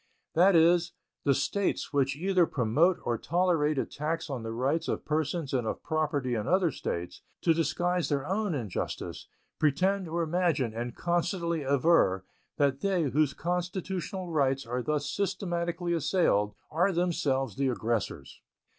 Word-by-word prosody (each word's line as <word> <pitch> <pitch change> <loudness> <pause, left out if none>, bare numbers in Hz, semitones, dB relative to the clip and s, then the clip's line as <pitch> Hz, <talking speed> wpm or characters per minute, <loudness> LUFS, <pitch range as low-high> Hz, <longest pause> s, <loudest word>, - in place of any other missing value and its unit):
That 180 +3 +5
is, 170 +1 +4 0.3
the 140 -2 +4
States 200 -2 -1
which 140 -1 +2
either 180 +1 +2
promote 145 +9 +2
or 120 -2 -1
tolerate 165 -3 +1
attacks 155 +4 -2
on 130 -3 -3
the 115 0 -5
rights 130 +8 0
of - - -2
persons 155 -1 -1
and 125 -4 0
of - - -4
property 150 -5 -1
in 110 -3 -2
other 185 -3 +3
States, 90 -5 -5 0.2
to 165 - +4
disguise 175 +2 0
their 140 -2 0
own 195 0 -1
injustice, 115 -9 -4 0.3
pretend 180 +6 +2
or 170 +1 -1
imagine, 160 -8 0
and 120 +1 -4
constantly 170 -1 -1
aver, 135 - +3 0.3
that 140 -1 +1
they, 190 -4 +1
whose 150 -1 +2
constitutional 180 +1 -3
rights 135 -3 +1
are 125 +2 -2
thus 150 +1 -1
systematically 175 -3 -2
assailed, 130 - +1 0.2
are 180 +5 +2
themselves 155 -7 0
the 135 0 0
aggressors. 115 -3 -2
155 Hz, 145 wpm, -29 LUFS, 135-175 Hz, 0.3 s, That